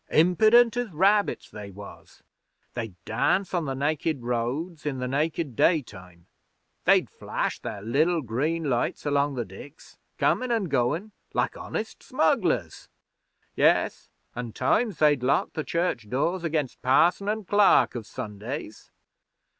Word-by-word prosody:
Impident 215 +8 +5
as 245 -2 -1
rabbits, 200 +5 +1
they 105 -1 -8
was. 100 +1 -13 0.5
They'd 115 -6 -5
dance 180 - 0
on 175 -3 0
the 135 -2 -3
nakid 145 0 -1
roads 125 +8 -2
in 145 -3 -2
the 125 - -3
nakid 145 +1 -1
daytime; 95 - -1 0.6
they'd - - +4
flash - - -3
their 100 - -6
liddle 155 +8 +1
green 150 +9 -1
lights 130 -2 -1
along 145 -1 +1
the 120 -2 -2
diks, 115 - -13 0.2
comin' 255 -1 +1
an' 230 -3 +1
goin', 145 - 0 0.2
like - - 0
honest - - -5
smugglers. - - 0 0.7
Yes, - - +2 0.3
an' 120 -2 -5
times 220 -7 +1
they'd 150 -4 +3
lock 135 +4 +1
the 155 - -3
church 170 -12 -2
doors 170 - -1
against 155 -5 -2
parson 170 +10 +3
an' 215 -1 -2
clerk 205 +2 +4
of 115 -3 -6
Sundays.' 110 +3 -7
145 Hz, 135 wpm, -26 LUFS, 120-175 Hz, 0.7 s, Impident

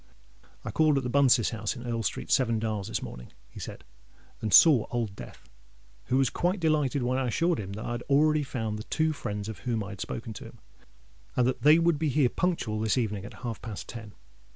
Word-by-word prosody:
"I - - -3
called 155 -2 +3
at 135 - 0
the 125 - -3
Bunces' 130 -4 +4
house 110 0 -3
in 120 -1 -8
Earl 115 -1 -2
Street, - - -3
Seven 115 -3 +3
Dials, 110 -3 -2
this 110 - -3
morning," - - -9 0.2
he - - -10
said, - - -8 0.6
"and 110 - -2
saw 125 - +7
Old 115 -5 -2
Death, - - -11 0.6
who 130 - +1
was 135 -2 +2
quite 180 +3 0
delighted 150 -5 +1
when 130 +2 0
I 130 - 0
assured 165 +7 +1
him 100 -1 -5
that 110 - -6
I - - -3
had 120 0 -3
already 150 +2 +4
found 110 -7 -3
the - - -6
two 155 0 0
friends 105 -7 -5
of 110 - -6
whom 115 -4 -2
I 100 - -7
had 100 -1 -8
spoken 115 -1 -5
to - - -9
him, - - -12 0.8
and 125 - +3
that 130 +1 0
that - - -28
they 150 +2 +7
would 170 -2 +2
be 155 -1 +1
here 140 -2 +3
punctual 120 -13 -1
this 110 +3 +1
evening 105 -5 -1
at - - -12
half 115 -3 -4
past 110 -4 -7
ten. 110 -3 -9
120 Hz, 230 wpm, -28 LUFS, 110-145 Hz, 0.8 s, saw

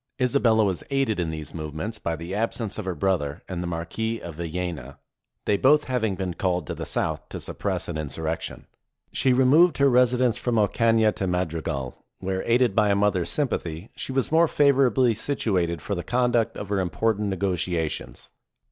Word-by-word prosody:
Isabella 125 -4 +3
was 95 -3 -1
aided 135 -7 0
in 85 -2 -1
these 80 -1 -6
movements 80 +8 -5
by 85 -4 -2
the 85 +4 -7
absence 110 0 -2
of 105 - -5
her 95 -2 -2
brother 75 -4 -1
and 90 -2 -4
the 90 - -3
Marquis 100 +7 -3
of 85 - -8
Villena, 85 -4 -5 0.5
they 105 - +2
both 150 +5 +5
having 115 -6 -1
been 95 -1 -3
called 90 -2 -1
to - - -4
the - - -6
south - - -2
to - - -6
suppress - - -3
an 80 -2 -4
insurrection. 80 +2 -4 0.5
She 130 - +2
removed 135 +6 +5
her 140 -1 +4
residence 125 -1 +3
from 120 -2 0
Ocana 110 +1 +3
to 95 - -1
Madrigal, 80 -7 -3
where, 95 0 -2
aided 120 -3 +3
by 105 -2 +4
a 100 - +3
mother's 100 -4 +1
sympathy, 95 - -2
she - - -5
was 130 +1 0
more 165 +1 +5
favorably 135 -4 +3
situated 95 - -1
for 100 - -3
the 90 -3 -3
conduct 120 -2 +1
of 100 - -6
her 100 -1 +1
im 90 -2 0
portant 105 +1 0
negotiations. 90 -4 -2
100 Hz, 180 wpm, -25 LUFS, 85-120 Hz, 0.5 s, both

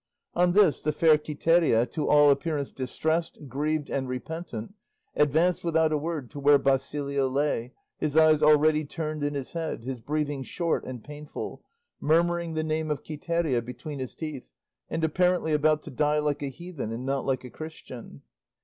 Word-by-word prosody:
On 175 0 +3
this 195 -6 +4
the 150 - 0
fair 155 +1 +5
Quiteria, 155 -5 +2
to 150 - -2
all 145 -1 +6
appearance 145 0 -1
distressed, 160 +5 -2
grieved, 150 +2 -1
and 135 -1 -2
repentant, 130 - -5 0.4
advanced 160 +5 +2
without 160 -2 +2
a 155 - +2
word 155 -5 -4
to 145 - -7
where 145 +1 +6
Basilio 140 0 0
lay, 130 -3 -1 0.3
his 155 0 -1
eyes 155 -1 +6
already 155 +1 +5
turned 155 0 -4
in 145 0 -1
his 135 -2 -5
head, 165 -8 -3
his 130 0 -4
breathing 145 +2 -2
short 165 +5 -1
and 125 -3 -7
painful, 150 0 -7 0.4
murmuring 170 +1 +1
the 155 - 0
name 155 0 -1
of 150 - -2
Quiteria 155 -4 -1
between 135 +4 -7
his 130 -2 -5
teeth, 155 -5 -6 0.4
and 165 - -2
apparently 180 0 +2
about 150 0 +2
to - - -8
die 150 +3 +1
like 150 -1 0
a 145 - -2
heathen 155 -4 -6
and 120 +3 -5
not 135 0 -1
like 130 -2 -1
a 125 - -9
Christian. 130 - -10
150 Hz, 170 wpm, -27 LUFS, 135-160 Hz, 0.4 s, all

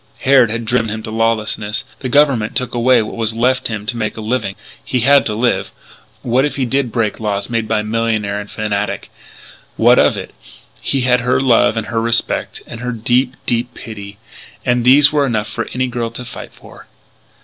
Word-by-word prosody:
Harrod 130 -4 +5
had 115 +1 -3
driven 115 0 +1
him 110 +1 -5
to 110 - -6
lawlessness; 110 -1 -1
the 130 - -4
Government 135 -6 +2
took 125 - -2
away 120 -1 +3
what 105 - -7
was 115 -1 -1
left 125 +2 +1
him 105 -2 -5
to 120 - -2
make 110 -1 -3
a - - -5
living. 110 -3 -2 0.3
He 125 - -1
had 140 +3 +5
to 105 - -2
live. 120 +2 0 0.5
What 125 +2 +2
if 150 - -1
he 135 - 0
did 130 0 0
break 110 -3 -1
laws 105 0 -2
made 115 -2 -1
by 110 -1 0
millionaire 110 -2 -1
and 105 0 -8
fanatic! 105 -1 -3 0.7
What - - +5
of - - +3
it? - - -7 0.5
He 135 - 0
had 125 0 +3
her 125 +1 +1
love 120 -3 +3
and 110 - -1
her 115 -1 -2
respect 115 0 0
and 115 - -9
her 125 +1 -3
deep, 125 +3 0
deep 120 0 -1
pity. 100 -2 -9 0.5
And 125 -1 +2
these 140 +3 +6
were 150 -1 +2
enough 110 -3 -1
for 115 +2 -4
any 130 +1 -1
girl 120 -2 -3
to 120 +2 -8
fight - - -9
for. - - -16
115 Hz, 200 wpm, -17 LUFS, 110-125 Hz, 0.7 s, these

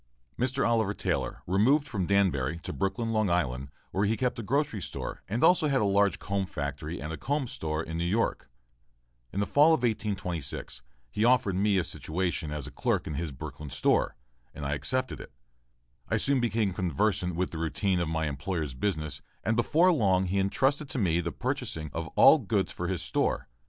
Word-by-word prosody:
Mr. 130 +2 +1
Oliver 110 -3 +1
Taylor 65 - -2
removed 125 - +3
from 100 -9 -2
Danbury 85 -7 +2
to - - -4
Brooklyn, 100 +4 -1
Long 110 -3 +1
Island, 70 -6 0 0.2
where 100 +2 +1
he 110 +2 +1
kept 125 -2 -1
a - - -2
grocery 135 -1 0
store - - -5
and 115 +6 -1
also 175 -4 +5
had 135 -2 +2
a 105 - +2
large 100 0 +3
comb 100 -1 -2
factory 75 +2 -4
and 75 +2 -5
a - - -5
comb 140 - -1
store 80 -8 -3
in 80 +1 -5
New - - 0
York. 105 +7 0 0.8
In 100 - -3
the 100 - +2
fall 150 +8 +5
of 125 - -6
1826 95 - -2 0.3
he 105 - 0
offered 120 -6 +3
me 100 +1 +2
a 90 - +2
situation 85 0 -2
as 75 -3 -4
clerk - - -1
in 75 - -4
his 75 +1 -3
Brooklyn 70 +3 -8
store, 70 +2 +1 0.4
and 75 - -6
I 70 - 0
accepted 130 - -2
it. - - -11 0.8
I - - +2
soon 140 -1 +2
became 110 -4 +1
conversant 90 +1 0
with 90 +2 -1
the 80 - -5
routine 90 +3 0
of 85 -2 -1
my 80 0 0
employer's 75 0 -3
business 75 -2 -2 0.2
and 115 - +1
before 160 +10 +4
long 95 - +3
he 95 +2 0
entrusted 135 +9 +1
to 130 - -3
me 85 -7 +2
the 85 0 -3
purchasing 75 -2 -3
of 80 0 -3
all - - +8
goods - - 0
for 90 - -4
his 90 -1 -2
store. 65 - 0
95 Hz, 195 wpm, -29 LUFS, 80-115 Hz, 0.8 s, all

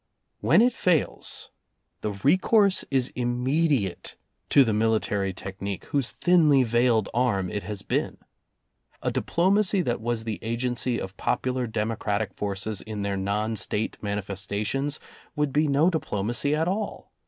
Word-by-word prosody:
When 160 - +5
it 245 0 +3
fails, 175 -8 -1 0.5
the 105 - -2
recourse 185 - +3
is 130 -2 +1
immediate 125 - 0 0.3
to 140 - +7
the 115 -4 0
military 105 -2 +1
technique 95 +1 -6
whose 140 -4 0
thinly 155 -7 +4
veiled 120 -2 +2
arm 105 -7 +1
it 105 - -2
has 100 +1 -5
been. - - -1 0.9
A - - 0
diplomacy 195 +2 +2
that 120 -8 -1
was 115 -1 -1
the 110 -2 -4
agency 120 +1 -1
of 95 0 -6
popular 130 -1 -1
demo 110 0 -2
cratic 105 -2 -1
forces 100 +1 -3
in 105 -2 -5
their 100 0 -1
non 105 +3 -1
State 105 +2 -2
manifestations 105 +7 -2 0.4
would 150 -2 0
be 150 +1 +3
no 145 +5 +3
diplomacy 130 - -1
at 160 +2 0
all. 205 +3 -3
120 Hz, 140 wpm, -26 LUFS, 105-145 Hz, 0.9 s, to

